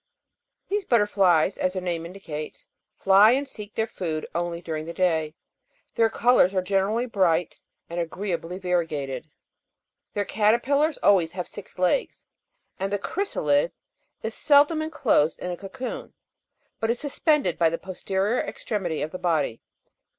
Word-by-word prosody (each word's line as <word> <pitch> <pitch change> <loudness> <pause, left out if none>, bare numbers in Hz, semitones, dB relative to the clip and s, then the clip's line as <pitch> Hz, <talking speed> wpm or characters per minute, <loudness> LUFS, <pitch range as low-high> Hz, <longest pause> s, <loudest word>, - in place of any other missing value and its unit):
These 405 0 -1
butterflies, 200 - +3
as 185 - 0
their 185 - -3
name 170 -2 -2
indicates, 160 -5 -7 0.3
fly 200 +4 +6
and 275 +2 0
seek 210 -4 -9
their 220 - +1
food 165 -8 -4
only 170 0 -2
during 160 -2 -5
the 170 - -7
day; 160 -4 +1 0.6
their 225 -1 +3
colours 225 -5 +3
are 185 - +3
generally 200 +5 +1
bright 180 -7 +1 0.3
and 170 +1 -4
agreeably 175 0 -3
variegated. 160 -7 -2 0.9
Their 205 -1 0
caterpillars 250 +10 +2
always 175 -5 +4
have 180 -1 -4
six 205 - -11
legs, 185 - 0 0.5
and 195 +1 -2
the 205 - +1
chrysalid 170 - 0 0.5
is 220 0 -3
seldom 295 +4 +4
enclosed 275 - +1
in 180 - -4
a - - -3
cocoon, 200 +8 -7 0.6
but 225 - -1
is 240 +1 0
suspended 290 - +1
by 165 -1 +5
the 165 - -2
posterior 190 +5 -1
extremity 180 -8 -3
of 155 - -4
the 185 - -6
body. 165 -10 0
190 Hz, 145 wpm, -25 LUFS, 170-225 Hz, 0.9 s, fly